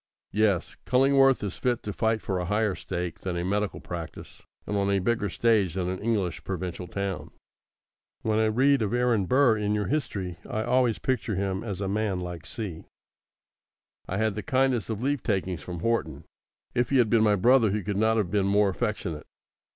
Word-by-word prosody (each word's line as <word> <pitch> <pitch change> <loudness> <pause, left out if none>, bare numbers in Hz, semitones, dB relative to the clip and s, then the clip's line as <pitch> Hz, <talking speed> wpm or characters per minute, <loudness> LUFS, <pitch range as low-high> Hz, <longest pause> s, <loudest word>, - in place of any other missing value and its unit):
Yes; 105 -4 +1
Cullingworth 135 +1 +4
is 100 -3 -4
fit 125 -2 0
to 105 - -4
fight 110 0 0
for 95 -2 -1
a 90 - -2
higher 105 +2 +1
stake 90 -2 -4
than 90 -2 -3
a 85 - -2
medical 105 +2 -1
practice, 85 -2 -8 0.2
and 105 - -3
on 100 0 +1
a 100 - +3
bigger 105 +2 0
stage 105 -4 +2
than 90 -2 -1
an 95 0 -3
English 105 -6 -1
provincial 90 -1 -4
town. 100 -1 -4 0.9
When 110 0 +1
I 110 - +3
read 135 +5 +3
of 105 +2 0
Aaron 120 -6 +2
Burr 125 -2 +4
in 105 0 0
your 105 -1 0
history 100 - -2
I 110 - -1
always 120 -2 +2
picture 120 -5 -1
him 95 0 -2
as 100 -4 -5
a 100 - -1
man 100 -1 -1
like 90 -3 -6
C. 95 -8 -5 1.2
I 95 - -1
had 110 0 +1
the 105 - -4
kindest 130 +1 +1
of 110 +1 -3
leave 140 -1 0
takings 95 -5 -1
from 85 +1 -6
Horton. 85 -10 -1 0.5
If 120 -1 +1
he 135 - +3
had 120 -4 +3
been 115 -2 +5
my 105 -1 +4
brother 115 +3 +4
he 105 +1 -1
could 105 +1 -2
not 110 +2 +3
have 100 -5 0
been 100 -2 +2
more 100 0 +3
affectionate. 90 -5 -3
105 Hz, 195 wpm, -27 LUFS, 95-115 Hz, 1.2 s, been